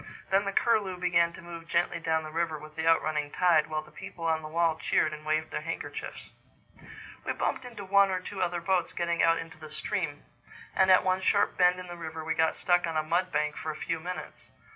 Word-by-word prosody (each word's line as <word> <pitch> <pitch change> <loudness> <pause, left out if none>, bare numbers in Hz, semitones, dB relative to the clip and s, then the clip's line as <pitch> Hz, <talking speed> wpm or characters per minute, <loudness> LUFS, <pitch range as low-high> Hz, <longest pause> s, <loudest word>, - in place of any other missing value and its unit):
Then 195 +1 +3
the 200 - -1
Curlew 205 -4 +2
began 170 -1 +3
to 175 - -11
move 170 -1 -9
gently 170 0 +1
down 160 -1 0
the 155 - -7
river 165 -1 -1
with 155 0 -12
the 160 0 -2
out 165 0 +5
running 150 -1 -1
tide, 170 -2 +3
while 155 0 -2
the 155 - -17
people 165 +2 -8
on 160 -1 +1
the 155 - -7
wall 165 0 +2
cheered 155 -1 +1
and 155 0 -8
waved 155 +1 -1
their - - -3
handkerchiefs. 165 +2 -6 0.9
We - - -1
bumped 260 - -2
into 225 -5 -8
one 200 +1 +5
or 185 -1 0
two 190 +1 -6
other 175 -1 0
boats 180 -3 0
getting 170 -1 0
out 165 0 +4
into 165 -1 -8
the 155 -1 -10
stream; 155 -1 -3 0.5
and 190 0 +4
at 185 - +7
one 185 0 +1
sharp 200 +1 +2
bend 180 0 +4
in 185 - -7
the 175 -1 -8
river 160 -1 -6
we 160 - 0
got 160 0 +2
stuck 175 -1 +2
on 165 -1 -2
a 155 - +1
mud 175 +4 0
bank 150 0 0
for 160 - -5
a 155 - -3
few 165 +1 -3
minutes. 180 +3 -7
170 Hz, 235 wpm, -29 LUFS, 155-180 Hz, 0.9 s, at